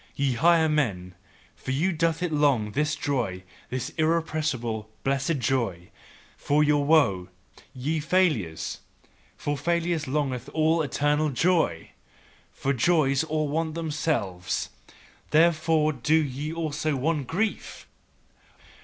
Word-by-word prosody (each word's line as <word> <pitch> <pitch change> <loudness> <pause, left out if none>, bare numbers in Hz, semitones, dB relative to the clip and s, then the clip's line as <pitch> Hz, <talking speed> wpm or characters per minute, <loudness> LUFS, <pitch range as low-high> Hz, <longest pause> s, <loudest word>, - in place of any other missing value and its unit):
Ye 140 -2 +1
higher 165 +5 +4
men, 105 -13 -1 0.4
for - - -10
you 155 +9 +1
doth 165 0 0
it 170 -3 -1
long, 140 -8 +2
this 150 +5 0
joy, 115 -10 -2 0.3
this 130 0 -3
irrepressible, 155 -9 -1
blessed 140 +3 0
joy 115 -9 -1 0.5
for 150 +1 +1
your 145 -1 +3
woe, 105 - +3 0.5
ye 150 +5 -1
failures! 150 - 0 0.6
For 145 - -2
failures, 170 +1 -1
longeth 135 -2 -2
all 160 +1 +3
eternal 150 +1 +1
joy. 165 +6 +1 0.6
For 140 - -1
joys 140 +1 +2
all 155 -1 -1
want 160 +2 -2
themselves, 145 - -2 0.6
therefore 155 -1 +3
do 150 +4 +2
they 140 +4 -5
also 155 -2 -2
want 145 0 -1
grief! 210 +5 -3
150 Hz, 115 wpm, -26 LUFS, 130-160 Hz, 0.6 s, higher